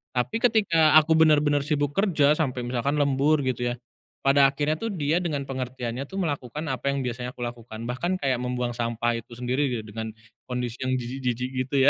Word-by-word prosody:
Tapi 125 - 0
ketika 170 -10 +4
aku 160 +1 +2
bener-bener 150 -2 +4
sibuk 145 -1 0
kerja 165 -8 +3
sampai 130 -6 -1
misalkan 130 +4 0
lembur 145 +2 +3
gitu 125 -1 -1
ya, - - -3 0.5
pada 140 0 +6
akhirnya 145 +2 0
tuh 225 - -2
dia 155 -1 +1
dengan 150 -5 -1
pengertiannya 125 -1 -4
tuh - - -18
melakukan 150 -1 -3
apa 130 +2 -1
yang 140 - -1
biasanya 125 0 -4
aku - - -11
lakukan 115 -1 -7
bahkan 175 +10 -1
kayak 130 -2 +1
membuang 125 -1 -1
sampah 115 0 -1
itu 120 +1 -13
sendiri 125 0 0
dengan 110 +1 -5 0.4
kondisi 125 -1 -3
yang 130 - 0
jijik-jijik 125 0 -3 0.2
gitu 140 - -4
ya, - - +10
135 Hz, 180 wpm, -25 LUFS, 125-150 Hz, 0.5 s, ya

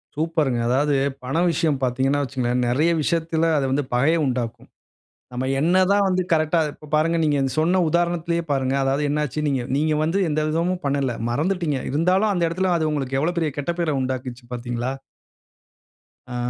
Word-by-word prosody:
சூப்பருங்க. 155 -5 0
அதாவது 140 +3 +2 0.3
பண 135 +6 -2
விஷயம் 155 -3 0
பார்த்தீங்கன்னா 130 +3 +1
வச்சிக்கங்களேன்! 125 -2 -1
நிறைய 150 +7 +2
விஷயத்தில 165 +1 0
அது 140 - +1
வந்து 145 +2 +1
பகைய 140 +7 +3
உண்டாக்கும். 120 -3 -3 0.6
நம்ம 125 +1 -3
என்னதான் 185 +5 +3
வந்து 185 0 +1
கரெக்ட்டா 155 +1 +2
இப்ப 150 - -15
பாருங்க 160 +2 +2
நீங்க 150 -2 +2
அந்த 135 -1 -1
சொன்ன 180 +4 +2
உதாரணத்திலேயே 170 0 0
பாருங்க. 135 -1 0
அதாவது 135 +2 0
என்னாச்சு 150 -1 -1
நீங்க, 135 -3 0
நீங்க 155 +1 +1
வந்து 165 +5 0
எந்த 155 0 0
விதமும் 175 +3 -1
பண்ணல. 140 -3 0 0.2
மறந்துட்டீங்க. 160 +2 0
இருந்தாலும், 180 +9 +2
அந்த 175 -3 -1
இடத்தில 185 +2 0
அது 160 -2 0
உங்களுக்கு 135 -3 -2
எவ்வளவு 170 +4 -1
பெரிய 160 -2 0
கெட்ட 145 +4 -1
பேர 160 -3 0
உண்டாக்கிருச்சு 130 -1 -4
பார்த்தீங்களா? 120 +1 -3 1.4
ஆ 125 - -4
150 Hz, 160 wpm, -22 LUFS, 130-170 Hz, 1.4 s, பகைய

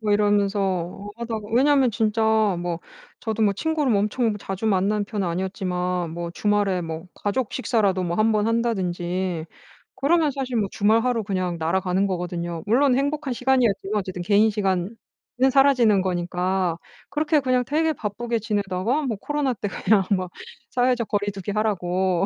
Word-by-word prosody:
뭐 210 -2 0
이러면서 200 -2 0
하다가 225 -3 -5
왜냐하면 270 0 +4
진짜 220 0 0 0.4
뭐 175 -1 -3 0.4
저도 220 -1 -2
뭐 205 -2 +4
친구를 300 0 0
엄청 215 +2 +1
자주 195 +2 -4
만나는 205 +1 +1
편은 205 -2 -3
아니었지만 180 -1 -2
뭐 170 +1 -5
주말에 205 0 +1
뭐 165 -1 -5
가족 210 +3 -2
식사라도 205 -7 +1
뭐 170 -1 -2
한번 215 -1 +2
한다든지 185 -6 -1 0.5
그러면 310 +1 +2
사실 260 -3 -3
뭐 210 -3 +1
주말 220 +2 +3
하루 245 -3 0
그냥 185 -3 -2
날아가는 180 +3 0
거거든요. 175 -2 -3
물론 255 +4 +3
행복한 285 0 -1
시간이었지만 235 -5 +1
어쨌든 185 -2 -5
개인 210 +4 +4
시간은 195 -1 -1 0.6
사라지는 255 -7 +4
거니까 180 -1 -1 0.3
그렇게 305 0 +2
그냥 255 -2 +1
되게 315 +2 +1
바쁘게 230 +2 -3
지내다가 205 +5 -1
뭐 240 -6 -1
코로나 295 -3 -1
때 205 -2 -4
그냥 195 +1 +2
막 185 -2 +1 0.4
사회적 245 -2 +1
거리두기 205 -1 -2
하라고 190 -3 0
205 Hz, 355 characters per minute, -23 LUFS, 185-235 Hz, 0.6 s, 왜냐하면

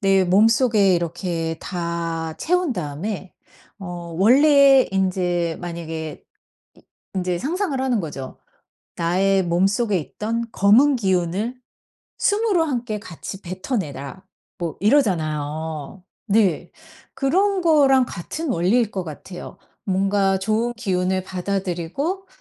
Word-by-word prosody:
내 195 -2 +4
몸속에 210 +1 +4
이렇게 170 -1 -2
다 170 -2 -3
채운 360 -3 +1
다음에 180 +3 -5 0.5
어 175 -3 -7
원래 275 - +6
인제 180 -3 0
만약에 165 -2 -6 0.5
이 - - -21 0.3
인제 180 -2 -1
상상을 315 - -2
하는 255 -4 +1
거죠. 140 -6 -7 0.6
"나의 190 +3 +2
몸속에 195 +4 +1
있던 225 +8 -3
검은 250 +9 +5
기운을 195 +3 -1 0.6
숨으로 410 -5 +2
함께 240 -7 -2
같이 195 0 -8
뱉어내라." 185 - -5 0.3
뭐 170 -2 -4
이러잖아요. 160 - 0 0.2
네. 200 -6 +2 0.4
그런 380 +8 +1
거랑 275 -6 +4
같은 295 - -5
원리일 210 +6 +2
것 190 -2 -3
같아요. 175 +3 -9 0.3
뭔가 195 0 +1
좋은 220 +5 0
기운을 185 -4 -1
받아들이고 190 - -3
195 Hz, 230 characters per minute, -22 LUFS, 170-240 Hz, 0.6 s, 원래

